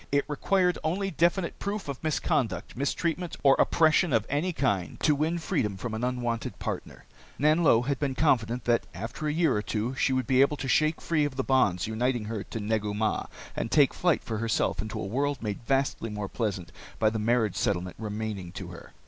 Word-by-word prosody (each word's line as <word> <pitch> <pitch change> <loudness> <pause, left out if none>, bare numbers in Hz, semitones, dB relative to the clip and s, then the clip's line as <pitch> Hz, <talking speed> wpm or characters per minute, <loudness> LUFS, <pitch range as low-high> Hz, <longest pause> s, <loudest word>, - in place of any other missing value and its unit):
It 140 0 +2
required 180 +4 +1
only 195 +5 -1
definite 170 +2 +1
proof 200 -2 -3
of 140 0 -6
misconduct, 145 -6 -1
mistreatment, 165 +6 -2
or 135 -1 +7
oppression 160 -1 +4
of 110 -2 +2
any 150 +6 +1
kind 100 - -1
to 150 - +4
win 155 +4 0
freedom 140 - -1
from 110 +4 -5
an 110 +2 -3
unwanted 120 -2 -2
partner. - - -5 0.3
Nanlo 150 -5 +4
had 140 -1 -1
been 140 -3 -1
confident 125 -5 +1
that 120 -1 +2
after 115 - -4
a - - +1
year 160 -4 +2
or 105 - 0
two 110 +4 -2
she 135 - +1
would 130 -1 +1
be 130 -1 +4
able 145 +2 +3
to 135 - -4
shake 155 +4 +2
free 155 -3 +1
of 145 -2 -2
the 135 - -1
bonds 130 -11 +2
uniting 120 +1 -1
her 105 -2 -4
to 115 - -6
Negu 105 -1 -1
Mah 110 0 0 0.3
and - - -2
take 145 0 +4
flight 175 -2 +1
for 110 -2 -3
herself 115 -2 0
into 110 0 -5
a - - -3
world 140 +5 -1
made 105 0 -3
vastly 135 -4 0
more 105 -1 -4
pleasant 95 -6 -3 0.3
by 110 -1 +3
the 110 - -2
marriage 110 -2 +1
settlement 90 -5 -1
remaining 105 -4 -4
to - - -7
her. - - -12
130 Hz, 200 wpm, -28 LUFS, 110-150 Hz, 0.3 s, or